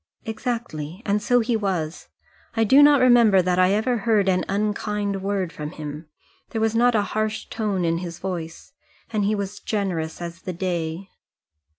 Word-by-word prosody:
"Exactly; 220 -7 -4
and 205 0 +1
so 245 +3 +3
he 230 +1 0
was. 180 -7 -2 0.5
I 225 - +4
do 265 +6 +6
not 290 -2 +6
remember 235 -7 +6
that 180 0 +1
I 185 +1 +4
ever 235 +4 +1
heard 210 -2 +2
an 185 -1 +2
unkind 205 0 -1
word 195 -3 -2
from 150 -1 -5
him. 150 0 -7 0.4
There 225 - -3
was 220 0 +1
not 240 +1 +3
a 210 - +3
harsh 215 0 -1
tone 205 -5 -1
in 165 0 +1
his 170 -1 -6
voice. 175 +4 -6 0.4
And 210 -2 +1
he 210 +1 +1
was 200 0 -4
generous 180 -7 -2
as 170 -1 -7
the 185 - -5
day." 175 0 -3
200 Hz, 175 wpm, -23 LUFS, 175-220 Hz, 0.5 s, do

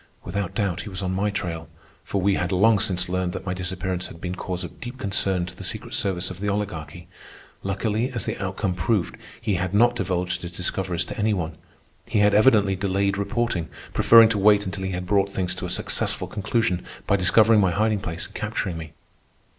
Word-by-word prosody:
Without 95 0 -3
doubt 100 -6 0
he 105 - -7
was 95 0 -5
on 90 - -1
my 100 +2 +1
trail, 85 -5 -4 0.3
for 100 - -2
we 100 +2 +3
had 90 0 -1
long 105 +3 +4
since 90 -3 0
learned 90 -1 -1
that - - -6
my 90 - -1
disappearance 90 0 -3
had 85 - -12
been 90 +1 -4
cause 90 0 -4
of 90 - -9
deep 120 +2 -6
concern 95 -4 0
to 90 - -10
the - - -9
secret - - -3
service 95 -1 0
of 90 - -9
the 105 +1 -1
Oligarchy. 85 -5 -4 0.5
Luckily, 105 +5 -1
as 120 -3 -1
the - - -2
outcome 95 0 -1
proved, 90 +1 0 0.2
he 110 -3 -1
had 90 +2 -2
not 120 +3 +5
divulged 90 -3 -1
his 85 0 -7
discoveries 90 -1 -1
to - - -7
any 105 0 +2
one. 80 -3 -3 0.5
He - - -1
had 105 0 +4
evidently 105 -3 +5
delayed 100 +1 0
reporting, 100 -4 -1 0.2
preferring 115 -1 +7
to 105 -2 0
wait 105 +1 +5
until 95 0 -3
he 95 - -2
had 90 0 -3
brought 100 +1 +2
things 90 -2 -1
to 90 - -5
a - - -6
successful - - -1
conclusion 105 -3 0 0.2
by 100 - +3
discovering 105 +4 +5
my 95 -2 +4
hiding 105 +3 +1
place 85 -4 -4
and - - -14
capturing 85 -3 -3
me. 80 -1 -9
95 Hz, 210 wpm, -24 LUFS, 90-105 Hz, 0.5 s, preferring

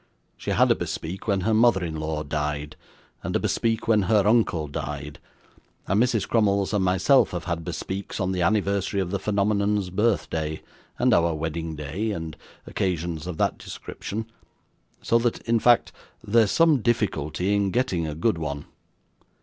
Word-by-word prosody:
She - - -7
had - - +4
a - - +5
bespeak 90 +7 -5
when 100 -2 +1
her 110 +4 +1
mother 110 -4 +4
in 80 -2 -4
law 75 0 -2
died, 75 0 -3 0.5
and - - -4
a - - +3
bespeak 115 0 0
when 110 -2 +4
her 105 -3 +4
uncle 105 -8 +2
died; 75 +1 -6 0.7
and 100 +3 +2
Mrs. 120 -5 +1
Crummles 100 -3 +2
and 100 -2 +2
myself 95 +9 +4
have 85 -2 -3
had 85 -1 -3
bespeaks 95 +5 -5
on 95 -1 0
the 90 -1 -1
anniversary 100 +1 +1
of 90 -2 -2
the 100 - -1
phenomenon's 100 -1 0
birthday, 85 -7 -1 0.3
and - - +3
our 85 -1 +3
wedding 80 +1 -4
day, 75 +9 -3
and 80 -6 -4 0.3
occasions 85 -3 -2
of 90 -3 -5
that - - 0
description, 110 +2 -6 0.8
so 115 - +3
that, 115 0 0
in 115 0 +1
fact, 120 +1 +4 0.3
there's 110 0 +3
some 165 0 +4
difficulty 95 -5 0
in 100 -1 +2
getting 95 -8 0
a 75 - -4
good 85 +1 0
one. 70 -2 -4
95 Hz, 165 wpm, -25 LUFS, 80-110 Hz, 0.8 s, a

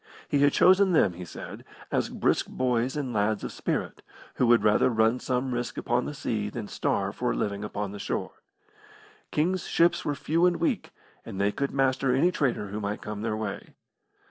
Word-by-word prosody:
He 145 - +1
had 145 0 +5
chosen 190 +3 +5
them, 100 - +4
he 90 +1 -8
said, 80 - -9 0.3
as - - 0
brisk - - +1
boys 125 +1 0
and 130 -4 -3
lads 105 0 0
of - - -4
spirit, - - -3 0.4
who 125 - +3
would 115 -3 +5
rather 105 +3 +4
run 115 +1 +2
some 125 0 -1
risk 120 -2 -3
upon 120 +1 0
the 145 - -5
sea 105 -6 -2
than 105 -1 -6
starve - - -1
for - - 0
a - - -3
living 100 - -2
upon 105 -1 -4
the 100 - -8
shore. - - -4 0.9
King's 175 +4 0
ships 170 +1 +3
were 145 - -1
few 165 +5 +2
and 175 - +2
weak, 170 - -1 0.3
and 95 - -7
they 100 +1 +2
could 140 +5 -2
master 135 -1 +1
any 170 +7 +3
trader 125 - -1
who 105 +2 -4
might 105 0 -4
come 105 -1 -5
their 110 -1 -1
way. 110 -2 -5
120 Hz, 195 wpm, -27 LUFS, 105-140 Hz, 0.9 s, had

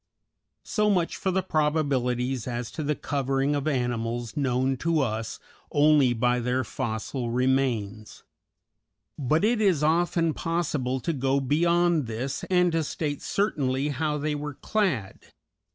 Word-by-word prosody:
So 210 -1 +1
much 180 -4 +1
for 190 - -2
the 190 0 +1
probabilities 135 - 0
as 120 -1 -4
to - - -5
the 150 0 0
covering 135 0 -1
of 145 +1 -2
animals 120 -3 -2
known 130 -2 +1
to 165 +3 +1
us 110 -3 -3 0.3
only 145 -3 +5
by 120 +1 +1
their 125 +2 0
fossil 120 +1 -3
remains; 120 -4 -1 1.0
but 150 +6 +1
it 225 +1 +2
is 180 -8 +3
often 165 +1 +2
possible 150 -7 -1
to 165 - -1
go 135 0 +1
beyond 170 +2 +2
this, 120 +4 -4
and 180 -1 +3
to 165 -1 +1
state 145 -1 -3
certainly 140 -8 0
how 150 +1 -1
they 150 +1 -1
were 150 -1 -5
clad. 160 - -1
140 Hz, 135 wpm, -26 LUFS, 125-160 Hz, 1.0 s, only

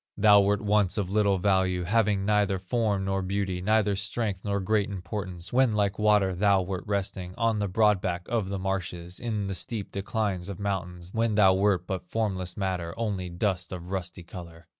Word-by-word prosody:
"Thou 105 -1 +7
wert 100 +1 +1
once 105 -2 +2
of 95 -3 -1
little 100 -2 +3
value, 95 -1 +1
Having 100 0 +1
neither 105 -2 +2
form 100 +1 -1
nor 95 0 0
beauty, 95 -1 -2
Neither 105 0 +2
strength 100 -1 -2
nor 100 -1 -1
great 105 +1 +1
importance, 90 -2 -5
When 130 -1 +4
like 100 -1 0
water 105 -3 +3
thou 100 +1 +3
wert 95 0 -4
resting 95 -2 -3
On 115 -2 +1
the 100 - 0
broad 105 0 +3
back 90 -1 -2
of 110 -5 -1
the 100 - -2
marshes, 90 -2 -4
On 110 -4 -1
the 95 - -3
steep 105 +2 -4
declines 100 -2 -2
of 100 -1 -6
mountains, 90 -3 -4
When 115 -1 +1
thou 95 -3 +6
wert 95 -2 +2
but 90 -1 -5
formless 95 -5 -2
matter, 90 -4 -2
Only 100 -6 -2
dust 90 0 -2
of 90 -1 -7
rusty 95 -2 -4
color. 85 -1 -10
95 Hz, 185 wpm, -27 LUFS, 90-105 Hz, -, Thou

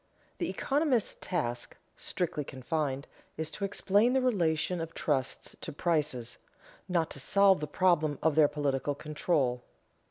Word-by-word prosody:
_The - - -1
economist's 275 -6 +1
task, 120 -9 -3 0.2
strictly 160 -4 -2
confined, 140 +1 -3 0.3
is 160 0 -2
to 200 - -6
explain 205 +4 +3
the 265 - +3
relation 175 -6 +1
of 165 0 -6
trusts 135 -4 -2
to - - -5
prices, 150 -7 -1 0.5
not 170 -3 +1
to 140 - -6
solve 195 +5 +4
the 150 - -3
problem 160 -6 +2
of 160 -1 +4
their 155 0 +6
political 145 -1 -1
control. 145 -4 0
155 Hz, 135 wpm, -30 LUFS, 145-185 Hz, 0.5 s, their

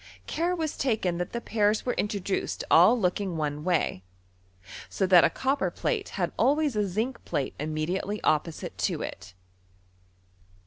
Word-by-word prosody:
Care 345 +2 -1
was 320 -3 -3
taken 210 -9 0
that 180 - -3
the 235 - -3
pairs 215 -2 +1
were 245 - 0
introduced 200 -2 -2
all 190 +9 +7
looking 185 -2 -1
one 150 -1 -2
way, 165 - 0 0.9
■o 190 - 0
that 180 -2 +7
a - - +5
copper 270 +2 0
plate - - -2
had - - -1
al¥rays 295 -2 +2
a 210 -1 +1
zinc 220 +8 -3
plate 135 - -2
im 155 +2 -3
mediately 180 +7 -2
opposite 155 +1 0
to - - -1
it. 95 0 -8
195 Hz, 150 wpm, -27 LUFS, 170-235 Hz, 0.9 s, all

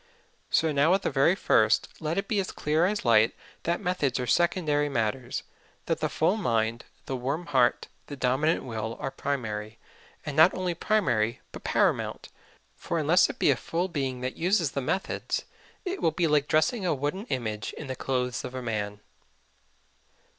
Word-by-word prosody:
So 160 - +2
now 150 +5 +4
at 195 - -2
the - - 0
very 140 +6 +4
first 110 - +3
let 160 +3 -2
it 195 0 -1
be 210 - +1
as 190 - -2
clear 155 +4 +1
as 210 -4 -2
light 115 -1 +4 0.3
that 170 +1 +1
methods 180 -9 0
are 125 - -1
secondary 150 0 +2
matters; 120 0 -2 0.4
that - - -1
the - - 0
full 180 +7 +1
mind, 115 - 0 0.2
the 135 - -3
warm 140 +7 -2
heart, 130 -5 +2 0.2
the 145 - -6
dominant 135 +5 +1
will 115 -2 -4
are 135 - -3
primary 115 -6 -3 0.5
and 150 - -4
not 160 +4 +6
only 180 -1 -1
primary 120 - +1
but - - -10
paramount; - - 0 0.5
for 170 - -3
unless 165 +4 +4
it - - -6
be - - +4
a - - +3
full 170 +9 -2
being 135 -6 -2
that 130 +1 -3
uses 175 -3 +2
the 140 - -2
methods 190 +9 -2 0.4
it 375 +1 -3
will - - +4
be 170 +1 0
like 150 -2 +2
dressing 155 +8 +2
a 175 -4 +1
wooden 150 - -3
image 110 -4 -3
in - - -7
the 130 -1 -4
clothes 125 -1 -2
of 130 0 -6
a 130 - -3
man. 105 -3 -3
145 Hz, 180 wpm, -27 LUFS, 125-170 Hz, 0.5 s, not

